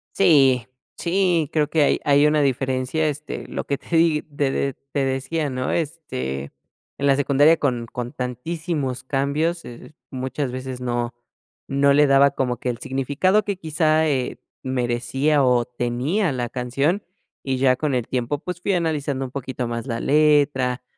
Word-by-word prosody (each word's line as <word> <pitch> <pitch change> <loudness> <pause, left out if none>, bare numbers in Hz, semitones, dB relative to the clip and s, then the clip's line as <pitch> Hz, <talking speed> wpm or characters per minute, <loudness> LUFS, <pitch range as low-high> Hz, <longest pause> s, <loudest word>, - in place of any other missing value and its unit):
Sí, 135 - +4 0.3
sí, 175 -4 +1
creo 150 -2 +1
que 155 -1 +3
hay - - +2
hay 145 +1 +5
una 150 0 +3
diferencia, 135 +3 0
este, 150 0 -5
lo - - -4
que 140 - -2
te 170 - -5
di 165 -2 +3
te 145 -2 -2
de 140 0 -1 0.2
te 140 -1 0
decía, 135 +4 -1
¿no? 130 -1 -2
Este, 70 - -3 0.5
en 140 - 0
la 135 - +5
secundaria 145 +3 +4
con 125 -6 -1
con 120 0 -5
tantísimos 135 +1 -3
cambios, 150 +6 0
eh, 120 +5 -11 0.2
muchas 130 +1 -3
veces 130 0 -6
no 120 -1 -2 0.6
no 140 +1 +3
le 145 +1 +5
daba 140 0 +5
como 125 -3 -1
que 125 - -6
el 120 -2 -3
significado 145 - +1
que 200 - -1
quizá, 160 -2 +1
eh, 130 -3 -1 0.3
merecía 130 +3 0
o 125 -1 +3
tenía 125 - -1
la 120 -2 -2
canción, 135 - -1 0.4
y 135 -1 -1
ya 130 -1 +3
con 150 -4 -1
el 125 -2 -1
tiempo, 130 +3 -2
pues, 180 -1 -5
fui 195 - 0
analizando 150 -6 -1
un 125 - -9
poquito 130 -1 -4
más 115 +2 -4
la 115 -2 -3
letra, 145 -4 +2
140 Hz, 165 wpm, -22 LUFS, 125-155 Hz, 0.6 s, hay